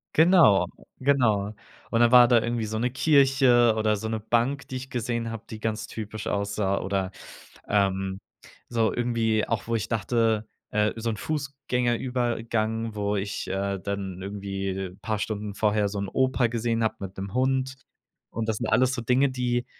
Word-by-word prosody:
Genau, 160 - +6 0.3
genau. 110 -7 +2 0.4
Und 115 - +2
dann 120 0 +5
war 125 -1 +9
da 120 -2 +4
irgendwie 120 -1 -1
so 110 +1 -3
'ne 125 +2 +1
Kirche 130 -4 +4
oder 110 -1 +2
so 110 +2 -4
'ne 110 0 -2
Bank, 120 +6 0
die 130 - -5
ich 130 +1 -8
gesehen 115 -1 -2
habe, 115 -1 -7
die 110 - -7
ganz 110 0 -2
typisch 110 -1 -6
aussah 100 -1 0
oder, 95 -1 -2 0.6
ähm, 95 -1 0 0.5
so 115 -2 +1
irgendwie 115 -3 0
auch, - - -2
wo 115 - 0
ich 110 - -2
dachte, 115 -1 +1 0.2
äh, 105 0 +1
so 115 0 -3
'n 110 - -5
Fußgängerübergang, 120 -5 -1
wo 105 0 -1
ich, 100 0 -3
äh, 100 0 -2
dann 95 -1 -4
irgendwie, 95 0 -4
äh, 95 -1 -4
paar 110 -2 -2
Stunden 105 -1 -3
vorher 105 0 +1
so 100 0 -4
'n 100 - -2
Opa 130 0 +2
gesehen 115 0 -1
hab 110 0 -1
mit 95 -1 -7
'nem 95 0 -6
Hund. 130 0 0 0.6
Und 115 -1 -3
das 110 - 0
sind 115 - -3
alles 130 +3 +3
so 125 - -3
Dinge, 125 +4 +3
die 125 -1 -1
110 Hz, 175 wpm, -26 LUFS, 105-120 Hz, 0.6 s, war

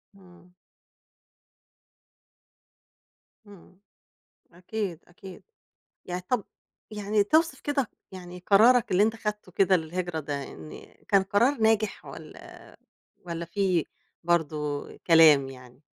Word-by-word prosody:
إمم. 180 -2 -19 3.0
إمم 185 -2 -17 0.7
أكيد، 180 0 -5
أكيد، 185 +1 -13 0.6
يعني 180 0 -4
طَب 245 -6 0 0.5
يعني 210 0 0
توصف 315 +4 +2
كده 280 -6 -2 0.2
يعني 180 -1 -9
قرارك 230 +4 +5
اللي 185 +2 +4
أنت 220 +1 +2
أخدته 210 -4 -5
كده، 190 +1 +3
للهجرة 170 0 -4
ده، 145 -1 -4
إن 80 - -12
كان 195 -1 +4
قرار 230 +8 +1
ناجح 220 -1 +1
والّا - - -13 0.5
والّا 170 0 -4
في 180 -1 0 0.4
برضو 150 -4 -1 0.2
كلام 155 -5 +6
يعني؟ 125 -1 -14
185 Hz, 100 wpm, -26 LUFS, 165-210 Hz, 3.0 s, كلام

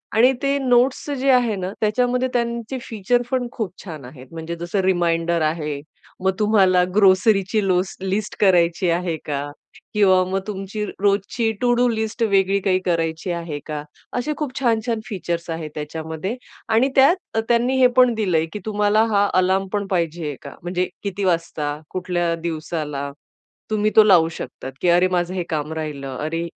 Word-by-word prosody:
आणि 250 +4 +6
ते 280 0 +1
नोट्स 255 +2 +2
जे 275 +1 +1
आहे 245 -4 +3
ना, 185 -1 -4
त्याच्यामध्ये 250 +4 +1
त्यांचे 235 +1 -2
फीचर 225 +2 0
पण 255 -2 0
खूप 215 -7 -4
छान 155 -8 -8
आहेत. 130 0 -12
म्हणजे 165 +1 -5
जसं 170 +4 -3
रिमाइंडर 170 -2 +1
आहे. 155 -2 -1 0.4
मग 190 - +3
तुम्हाला 195 -4 +4
ग्रोसरीची 195 +1 +3
लोस 185 +1 +1
लिस्ट 195 +2 -2
करायची 180 -2 +3
आहे 170 0 0
का? 145 -1 -2 0.5
किंवा 190 -3 +4
मग 190 +1 -1
तुमची 200 +1 -4 0.2
रोजची 205 +3 +1
टू-डू 245 0 +3
लिस्ट 220 0 -2
वेगळी 195 -2 +3
काही 185 -1 +2
करायची 165 0 -1
आहे 165 -4 -4
का? 150 -1 -4 0.3
असे 300 +5 -1
खूप 295 -4 -3
छान, 235 -4 +2
छान 230 -2 0
फीचर्स 175 -6 -4
आहेत 160 -2 -5
त्याच्यामध्ये. 160 +6 -4 0.3
आणि 230 +4 +3
त्यात 275 +7 +6 0.2
अ, - - +3
त्यांनी 240 +2 +2
हे 250 - +8
पण 245 - -7
पण 240 - 0
दिलंय, 180 -7 +1
की 210 - -4
तुम्हाला 210 0 +2
हा 200 0 +4
अलार्म 190 +1 +2
पण 200 -1 -1
पाहिजे 170 -3 -1
आहे 145 - -4
का? 140 - -9
म्हणजे 180 +1 -1 0.2
किती 200 0 -3
वाजता? 160 -4 -1
कुठल्या 175 -2 -1
दिवसाला? 155 -4 -3 0.6
तुम्ही 215 0 +1
तो 220 - +9
लावू 180 -6 +5
शकतात, 135 -4 -7
की 180 - +2
अरे, 175 +2 +5
माझं 175 0 0
हे 185 -2 -2
काम 150 -1 -2
राहिलं, 140 -4 -5
अरे, 160 +2 -2
190 Hz, 170 wpm, -21 LUFS, 165-220 Hz, 0.6 s, तो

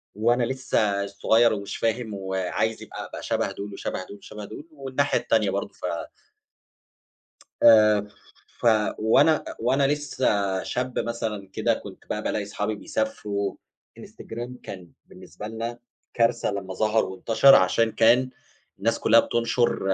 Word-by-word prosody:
وأنا 120 +4 +2
لسّه 115 -6 0
صغير 110 +3 +3
ومش 100 -1 -5
فاهم 115 -1 -1
وعايز 95 +3 -2
يبقى - - -8
أبقى - - -9
شبه - - -1
دول، 100 0 -7
وشبه 95 -1 -4
دول، 100 - -11
وشبه 105 +1 -9
دول 150 - -10
والناحية 140 -1 -1
التانية 110 -3 +1
برضه 100 +1 -3
ف - - -8 1.8
آآ 105 -2 +6 0.5
ف - - -6 0.3
وأنا 140 +8 +4 0.2
وأنا 135 +4 +2
لسّه 105 -10 0
شاب 125 0 -2
مثلًا 110 -4 -4
كده - - +1
كنت - - -9
بقى - - -3
بالاقي 105 - -1
أصحابي 105 +1 -3
بيسافروا. 100 -1 -3 0.4
الإنستجرام 120 +2 -8
كان 90 -3 -9 0.2
بالنسبة 105 - -10
لنا 115 +2 -5 0.3
كارثة 115 -1 +1
لما 100 -2 -5
ظهر 110 +3 +1
وانتشر، 110 +8 +5
عشان 115 +5 +3
كان 120 +4 +4 0.5
الناس 115 +4 0
كلها 115 +1 +6
بتنشر 120 +1 +1
110 Hz, 130 wpm, -25 LUFS, 100-120 Hz, 1.8 s, آآ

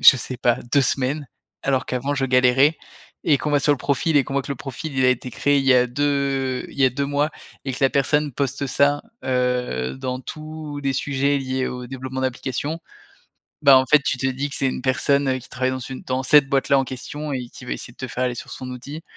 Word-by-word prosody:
je 130 - +9
sais 130 0 -4
pas 120 -1 +2
2 140 - +5
semaines 135 +2 0 0.3
alors 135 -1 0
qu'avant 130 +3 -1
je 135 - +1
galérais.» 130 +4 +4 0.5
et 145 -3 +5
qu'on 150 - -2
va 145 - +4
sur 145 +1 +4
le 145 - -2
profil 145 +4 +1
et 140 - +6
qu'on 135 - -6
voit 140 - +1
que 140 - -4
le 140 - -7
profil 135 +3 -6
il 130 - +3
a - - +6
été 125 0 -2
créé 145 +4 +2
il 135 - 0
y 135 - +6
a 125 0 +5
2 135 -1 0
il - - -14
y 135 - +5
a 130 - +5
2 140 +3 -2
mois 145 +2 +1 0.3
et 135 - -2
que 125 - -6
la 135 - +6
personne 145 +2 +1
poste 140 +2 -2
ça, 145 +2 +2 0.2
heu, 125 - 0
dans 125 - -3
tous 155 +1 -7
les 135 -1 +1
sujets 140 +1 +1
liés 130 -1 -2
au 125 0 -6
développement 130 0 -5
d'application. 130 +4 -2 0.8
Bah, 140 -2 +8
en 130 - +1
fait 150 - +5
tu 130 -4 0
te 135 - 0
dis 135 +2 -2
que - - -6
c'est 135 - +1
une 130 - -4
personne, 140 +2 +2
heu, 130 0 +1
qui 130 - -13
travaille 130 0 -1
dans 130 - -4
une 130 +1 -7
dans 130 +1 -2
cette 140 0 +6
boîte-là 140 0 +3
en 135 - +1
question 145 +4 -6
et 125 -3 -3
qui - - -12
va - - -3
essayer 120 - -6
de - - -25
te 130 - -4
faire 130 - -1
aller 125 - -1
sur - - -8
son 130 -1 -7
outil. 140 +5 -8
135 Hz, 250 wpm, -22 LUFS, 130-145 Hz, 0.8 s, je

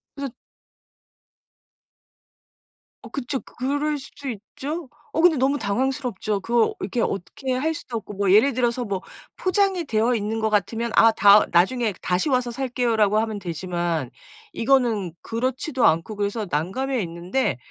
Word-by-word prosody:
그래서 280 -3 -4 2.7
어 - - -10
그쵸. 270 -1 -3
그럴 290 +4 -2
수도 275 0 -8
있죠. 270 - -6 0.3
어 320 - +1
근데 345 -3 +6
너무 275 +3 +2
당황스럽죠. 230 -2 -1
그거 230 +2 +1
이렇게 210 +5 -2
어떻게 255 +7 -2
할 310 +6 0
수도 255 -7 -5
없고 210 -1 -8
뭐 195 -1 +1
예를 235 +7 +5
들어서 245 0 0
뭐 195 -2 -3 0.4
포장이 375 -2 +1
되어 230 0 +1
있는 220 +1 -2
거 220 0 +1
같으면 225 +3 0
아 225 - +7
다 205 0 +6
"나중에 210 +5 +2
다시 180 +11 0
와서 250 -2 +1
살게요."라고 235 -5 +1
하면 220 -1 -1
되지만 170 -5 -3 0.4
이거는 230 -8 +1
그렇지도 255 +3 -1
않고 165 +7 +2
그래서 205 +1 -2
난감해 225 - -1
있는데 170 - -1
230 Hz, 305 characters per minute, -23 LUFS, 200-265 Hz, 2.7 s, 아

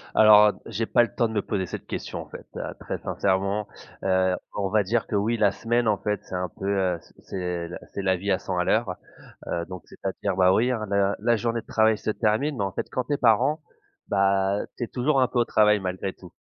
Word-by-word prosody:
Alors, 105 -1 +8
heu, - - -2
j'ai 115 +3 -2
pas 120 - +4
le 110 - -4
temps 115 - +1
de 110 - -7
me 105 - +1
poser 95 -3 -2
cette - - -7
question, - - -5
en - - -12
fait, - - -10
heu, - - -3 0.2
très - - -4
sincèrement, 100 +2 0 0.4
heu, 95 -1 +2 0.2
on 100 -2 -1
va 105 0 +3
dire 110 +2 0
que, - - -2
oui, 110 +4 +1
la 100 -2 +4
semaine, 120 +1 0
en 105 -2 +3
fait, 105 0 -2
c'est 95 - -7
un 90 -1 -2
peu, 95 - -3
heu, 95 -4 +1
c'est - - -22 0.2
c'est 90 -2 -3
la - - -6 0.2
c'est 100 - -3
la 95 -1 +1
vie 100 +2 -2
à 95 - +2
100 90 -2 -4
à 90 - +2
l'heure, 110 -4 +1 0.5
heu, 85 0 -2
donc 90 -3 -8
c'est - - -17
à 95 - +1
dire, 100 -3 0
bah, 95 0 +5
oui, 125 +5 +2
hein, 110 -3 -2
la 100 0 +2
la 120 -1 +2
journée 115 +1 -1
de - - -30
travail 110 -1 +3
se 110 - -2
termine, 120 +7 0
mais 100 - 0
en 95 - -2
fait, - - -4
quand 130 - -1
tu 145 - -1
es - - +1
parent, 130 +7 +3 0.5
bah, 100 0 +2 0.2
tu - - -3
es - - -2
toujours 135 +2 +1
un 125 - +4
peu 120 - -1
au 120 - +3
travail, 105 -1 +4
malgré 95 0 -3
tout. 90 -2 -14
100 Hz, 260 wpm, -25 LUFS, 95-115 Hz, 0.5 s, Alors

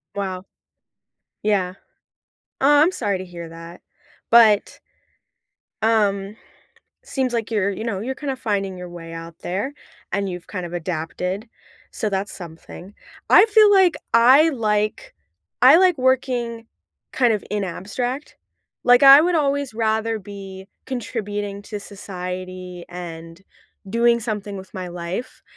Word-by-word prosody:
Wow. 190 -2 -3 1.0
Yeah. 190 -3 0 0.9
Oh, 290 +2 +5
I'm 345 +4 +4
sorry 200 - -1
to 185 - -6
hear 170 -2 -9
that. 165 +1 -11 0.5
But 220 -3 +5 1.0
Um, 205 -2 +1 0.7
seems 260 -3 -2
like 230 -1 -2
you're, 200 -2 +1
you 220 +3 -5
know, 200 -5 -2
you're 260 +4 -3
kinda 275 -2 -4
finding 200 -6 -2
your 180 0 -7
way 165 -1 -10
out 165 0 -9
there, 200 +10 -3 0.4
and 200 0 -1
you've 180 -1 -7
kinda 180 -3 -6
adapted. 180 - -4 0.4
So 215 - -2
that's 195 0 -2
something. 175 +2 -10 0.4
I - - +8
feel 425 -1 +6
like 380 -3 +5 0.2
I 260 +7 +7
like 215 - -1 0.5
I - - +9
like 360 -5 +4
working 245 -3 0 0.5
kind 245 -3 +3
of 210 - -2
in 205 -1 -1
abstract. 245 - -4 0.5
Like, 245 +2 +6
I 275 +1 +10
would 350 +2 +1
always 280 -5 0
rather 220 0 0
be 195 -1 -10 0.2
contributing 205 -5 -4
to 210 -1 -7
society 185 -2 -7
and 165 -1 -9 0.5
doing 235 +2 +3
something 210 -3 -4
with 190 -1 -11
my 185 -1 -5
life. 175 +6 -6
205 Hz, 130 wpm, -22 LUFS, 185-245 Hz, 1.0 s, I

